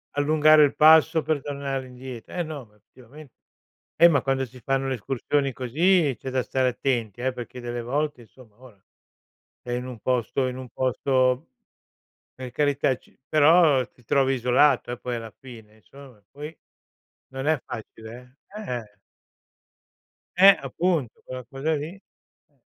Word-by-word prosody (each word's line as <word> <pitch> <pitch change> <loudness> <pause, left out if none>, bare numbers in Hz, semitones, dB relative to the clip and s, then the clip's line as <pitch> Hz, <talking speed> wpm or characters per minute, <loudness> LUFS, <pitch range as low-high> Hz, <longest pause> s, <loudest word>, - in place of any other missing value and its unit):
allungare 155 +1 +5
il 145 - +2
passo 160 +1 +6
per 155 -2 -1
tornare 140 -2 -4
indie 125 -2 -9
Eh 175 - -4
no, 155 -5 -7
ma 105 -1 -27
effettivame 130 +7 -16 0.7
Eh 170 - +8
ma 140 -6 +2
quando 135 0 -1
si 125 +1 -15
fanno 135 +1 -1
le 135 - -1
escursioni 135 +3 -1
così 150 +4 +2
c'è 130 - -6
da 130 -1 0
stare 130 0 0
attenti 120 -4 -2
eh, 130 0 -1
perché 125 0 -8
delle 120 0 -4
volte 145 +2 -2
insomma 115 -1 -19
ora, 115 -7 -17 0.8
è 120 - -7
in 125 +1 -3
un 125 -3 -8
posto 125 +2 -1
in 125 0 -5
un 130 -1 -9
posto 130 +1 0 0.9
per 130 -1 -8
carità, 145 0 +1
c - - -26 0.2
però 155 -4 +5
ti 125 - -26
trovi 135 +2 +2
isolato 125 +1 +2
eh, 125 - -6
poi 125 -1 -4
alla 115 -1 -7
fine 115 -5 -13
insomma; 130 +4 -16
e - - -34
poi 150 +3 -9 0.7
non 135 +1 -6
è 155 0 +2
facile 120 +3 -10 0.2
eh. 210 - -6
Eh-eh! 110 - -7 1.4
Eh, 195 +1 +8
appunto 145 -2 -2
quella 130 0 -7
cosa 145 +4 -2
lì. 155 +5 -5 0.5
Eh. - - -39
130 Hz, 160 wpm, -24 LUFS, 125-145 Hz, 1.4 s, Eh